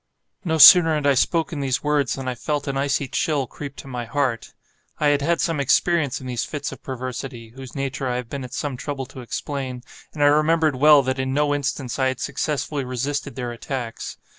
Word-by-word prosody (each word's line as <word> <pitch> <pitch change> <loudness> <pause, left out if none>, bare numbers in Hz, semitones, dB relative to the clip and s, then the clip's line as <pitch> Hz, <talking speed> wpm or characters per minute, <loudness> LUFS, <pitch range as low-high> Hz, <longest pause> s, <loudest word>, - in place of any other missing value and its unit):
No 160 -3 0
sooner 165 +1 +9
had 150 -1 -2
I 140 - +5
spoken 160 +3 0
these 135 -2 -1
words, 145 -3 +1
than 135 -1 -6
I 130 - -1
felt 145 +4 -3
an 140 - -2
icy 140 0 0
chill 145 +1 0
creep 140 +2 -8
to - - -11
my 125 -2 -5
heart. 125 -2 -2 0.4
I 150 - +2
had 145 0 +2
had 170 +3 +1
some 165 -5 0
experience 140 0 +2
in 130 - -10
these 125 -2 -2
fits 145 - -4
of - - -10
perversity 130 -2 -6
(whose 135 0 -10
nature 135 -1 -3
I 125 - -1
have 125 -1 -4
been 140 +3 -5
at 125 0 -8
some 145 -4 -3
trouble 140 0 -4
to 130 - -11
explain), 130 0 -5 0.3
and 145 - 0
I - - +6
remembered 155 +1 +3
well 145 +1 +6
that 130 0 -2
in 130 0 -1
no 145 0 +2
instance 140 -3 -3
I 130 - +3
had 130 - -2
successfully 145 -1 -2
resisted 135 +3 -3
their 125 -2 -4
attacks. 120 -1 -6
140 Hz, 215 wpm, -22 LUFS, 130-145 Hz, 0.4 s, sooner